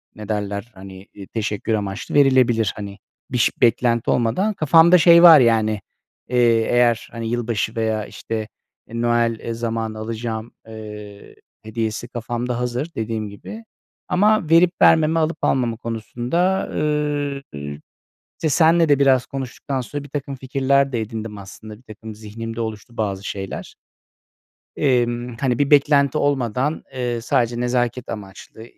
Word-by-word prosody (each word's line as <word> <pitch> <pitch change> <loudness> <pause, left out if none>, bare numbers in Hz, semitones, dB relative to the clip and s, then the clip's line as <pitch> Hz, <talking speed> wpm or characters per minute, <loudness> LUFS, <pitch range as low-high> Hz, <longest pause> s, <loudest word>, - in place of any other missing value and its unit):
ne 105 0 -10
derler, 105 +1 -3
hani, 95 0 -12 0.3
teşekkür 110 0 -2
amaçlı 100 -2 -3
verilebilir. 130 -6 +4
Hani, 100 -1 -8 0.3
biş 125 -2 +2
beklenti 115 0 +2
olmadan 155 - +1
kafamda 165 +1 +5
şey 170 +1 +7
var, 165 -3 +10
yani, 110 -3 +2 0.5
eee, 125 - -1 0.3
eğer, 120 -2 +2
hani, 115 -1 -5
yılbaşı 115 -1 -2
veya, 110 -2 -1
işte, 110 -1 -5 0.4
e, 115 +1 -5
Noel 115 -1 0
zamanı 115 -1 -3
alacağım, 110 0 -5 0.2
eee, 105 -2 -10 0.3
hediyesi 110 +1 -3
kafamda 120 0 -4
hazır 125 +6 -3
dediğim 110 -1 -3
gibi. 215 - -10 0.4
Ama 205 -3 +2
verip 170 +2 +5
vermeme, 160 0 +5
alıp 160 +1 0
almama 120 -4 +1
konusunda, 120 - -2
eee, 150 -2 -1 0.9
işte, 160 - -1
seninle 165 +1 +4
de 145 -1 +4
biraz 130 -2 +4
konuştuktan 135 0 -5
sonra 145 +4 -6
birtakım 140 -1 -5
fikirler 135 +1 +1
de 120 -3 -1
edindim, 110 -1 -6
aslında, 105 +2 -11
birtakım 110 -2 -11
zihnimde 115 +2 -7
oluştu 110 +1 -7
bazı 100 -3 -2
şeyler. 95 -1 -6 1.0
Emm, 120 -2 0
hani, 125 -3 0
bir 140 -1 +2
beklenti 140 -1 +4
olmadan, 135 +1 -1
eee, 120 -2 -2
sadece 120 0 0
nezaket 125 0 -1
amaçlı, 100 +1 -9
120 Hz, 130 wpm, -21 LUFS, 110-140 Hz, 1.0 s, var